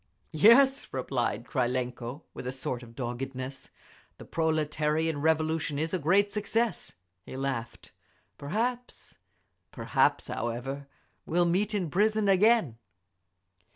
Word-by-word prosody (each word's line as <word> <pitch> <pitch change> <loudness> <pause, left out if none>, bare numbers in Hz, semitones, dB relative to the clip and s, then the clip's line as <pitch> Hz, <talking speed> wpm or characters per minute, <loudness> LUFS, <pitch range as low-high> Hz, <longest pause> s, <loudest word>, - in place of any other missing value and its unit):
"Yes," 260 - +5
replied 125 -3 -2
Krylenko, 125 +2 -2
with 125 - -7
a - - -1
sort 130 -2 -4
of 115 -1 -13
doggedness, 130 +2 -5 0.5
"The - - -11
proletarian 155 -1 0
Revolution 160 -1 +1
is 160 +3 -2
a 185 - +1
great 195 +6 +3
success." 220 - -1 0.3
He 130 - -8
laughed. 130 -4 -4 0.5
"Perhaps—perhaps, 235 - -2
however, 130 +5 -4 0.4
we'll 175 +2 +2
meet 195 +5 +1
in 180 -7 -2
prison 215 +2 +2
again!" 195 - +3
155 Hz, 105 wpm, -29 LUFS, 130-200 Hz, 0.5 s, Yes